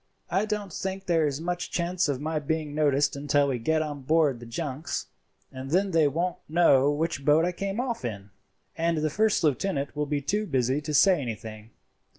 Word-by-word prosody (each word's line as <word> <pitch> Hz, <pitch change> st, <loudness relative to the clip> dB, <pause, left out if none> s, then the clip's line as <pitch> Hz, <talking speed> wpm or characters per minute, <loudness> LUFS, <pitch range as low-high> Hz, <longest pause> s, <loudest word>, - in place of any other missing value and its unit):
"I 195 Hz, +4 st, +2 dB
don't 210 Hz, -4 st, -4 dB
think 190 Hz, +2 st, -4 dB
there 165 Hz, -3 st, +2 dB
is 140 Hz, 0 st, -3 dB
much 175 Hz, +2 st, -3 dB
chance 175 Hz, -1 st, 0 dB
of 135 Hz, -3 st, -1 dB
my 155 Hz, +2 st, -2 dB
being 150 Hz, 0 st, -2 dB
noticed 145 Hz, -2 st, +2 dB
until 145 Hz, 0 st, +1 dB
we 125 Hz, -3 st, -1 dB
get 155 Hz, +7 st, +1 dB
on 145 Hz, -2 st, -6 dB
board 150 Hz, -2 st, +2 dB
the 120 Hz, -, -10 dB
junks, 145 Hz, +5 st, -4 dB, 0.5 s
and 130 Hz, +1 st, -7 dB
then 190 Hz, +5 st, +2 dB
they 160 Hz, -3 st, +4 dB
won't 170 Hz, +5 st, -1 dB
know 150 Hz, -5 st, +4 dB
which 150 Hz, 0 st, -1 dB
boat 150 Hz, +3 st, +4 dB
I 180 Hz, -, 0 dB
came 195 Hz, +4 st, -4 dB
off 245 Hz, -, -2 dB
in, 100 Hz, -4 st, -6 dB, 0.4 s
and 165 Hz, 0 st, 0 dB
the 155 Hz, 0 st, 0 dB
first 215 Hz, +3 st, +2 dB
lieutenant 145 Hz, 0 st, 0 dB
will 150 Hz, 0 st, -1 dB
be 145 Hz, 0 st, 0 dB
too 205 Hz, +9 st, -1 dB
busy 130 Hz, 0 st, +1 dB
to 150 Hz, 0 st, -4 dB
say 180 Hz, +1 st, +5 dB
anything. 110 Hz, -2 st, -7 dB
155 Hz, 195 wpm, -27 LUFS, 140-175 Hz, 0.5 s, say